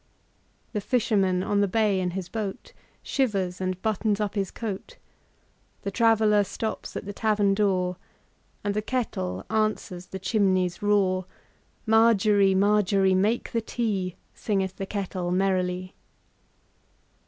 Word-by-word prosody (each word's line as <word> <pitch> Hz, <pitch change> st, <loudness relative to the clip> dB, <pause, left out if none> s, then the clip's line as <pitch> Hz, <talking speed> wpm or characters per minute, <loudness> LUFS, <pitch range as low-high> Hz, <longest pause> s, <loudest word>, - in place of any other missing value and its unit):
The 210 Hz, -, -1 dB
fisherman 195 Hz, -6 st, +1 dB
on 205 Hz, +1 st, +1 dB
the 200 Hz, -, +3 dB
bay 205 Hz, -1 st, +2 dB
in 180 Hz, -1 st, 0 dB
his 185 Hz, -2 st, -4 dB
boatShivers 200 Hz, -, -3 dB
and 185 Hz, -1 st, -2 dB
buttons 215 Hz, -1 st, 0 dB
up 210 Hz, -2 st, -1 dB
his 195 Hz, -3 st, -1 dB
coat; 225 Hz, -, -6 dB, 0.9 s
The 200 Hz, -, -2 dB
traveller 220 Hz, -1 st, +4 dB
stops 220 Hz, +3 st, -5 dB
at -, -, -6 dB
the 205 Hz, -, -5 dB
tavern 210 Hz, -2 st, +2 dB
door, 185 Hz, -3 st, +1 dB, 0.7 s
And 205 Hz, -, 0 dB
the 210 Hz, -, 0 dB
kettle 100 Hz, -, -3 dB
answers 215 Hz, -4 st, -1 dB
the 190 Hz, -, -6 dB
chimney's 190 Hz, -2 st, +1 dB
roar. 190 Hz, -3 st, +2 dB, 0.6 s
Margery, 215 Hz, -3 st, +4 dB
Margery, 200 Hz, -1 st, +3 dB
make 210 Hz, +6 st, +1 dB
the 230 Hz, -, 0 dB
tea, 205 Hz, -6 st, -2 dB, 0.2 s
Singeth 195 Hz, -3 st, -2 dB
the 195 Hz, -, -4 dB
kettle 185 Hz, -3 st, -3 dB
merrily. 185 Hz, 0 st, 0 dB
200 Hz, 125 wpm, -26 LUFS, 185-215 Hz, 0.9 s, traveller